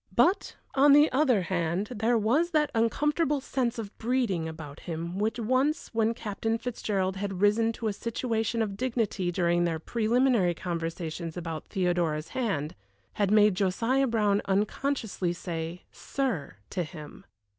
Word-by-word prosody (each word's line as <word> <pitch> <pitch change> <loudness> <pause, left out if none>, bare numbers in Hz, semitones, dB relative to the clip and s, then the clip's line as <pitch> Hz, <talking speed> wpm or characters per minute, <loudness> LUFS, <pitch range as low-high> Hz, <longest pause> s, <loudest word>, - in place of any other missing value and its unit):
But, 345 - +3 0.2
on 280 +1 +6
the 295 +2 +6
other 255 -8 +3
hand, 175 +2 -1
there 230 +2 +2
was 255 +11 +2
that 305 -3 +1
uncomfortable 295 +6 +1
sense 250 -2 -1
of 215 -3 -6
breeding 225 -9 0
about 160 -2 -9
him 170 +2 -5
which 220 +2 0
once, 255 +6 +1
when 225 0 +1
Captain 225 0 -2
Fitzgerald 200 -5 -2
had 195 -2 -3
risen 215 +3 +3
to 225 -1 -4
a 210 - 0
situation 230 +1 -1
of 200 -2 -4
dignity 215 -6 -1
during 175 0 +2
their 165 -2 0
preliminary 230 0 +2
conversations 165 -1 -4
about 165 -3 -5
Theodora's 175 -5 0
hand, 180 - -2 0.4
had 205 -2 +1
made 210 -1 +5
Josiah 230 +8 +1
Brown 210 -4 +2
unconsciously 205 -2 -1
say 170 0 -5
"Sir" 240 - -3 0.2
to 185 - -1
him. 155 +3 -10
210 Hz, 145 wpm, -28 LUFS, 175-240 Hz, 0.4 s, on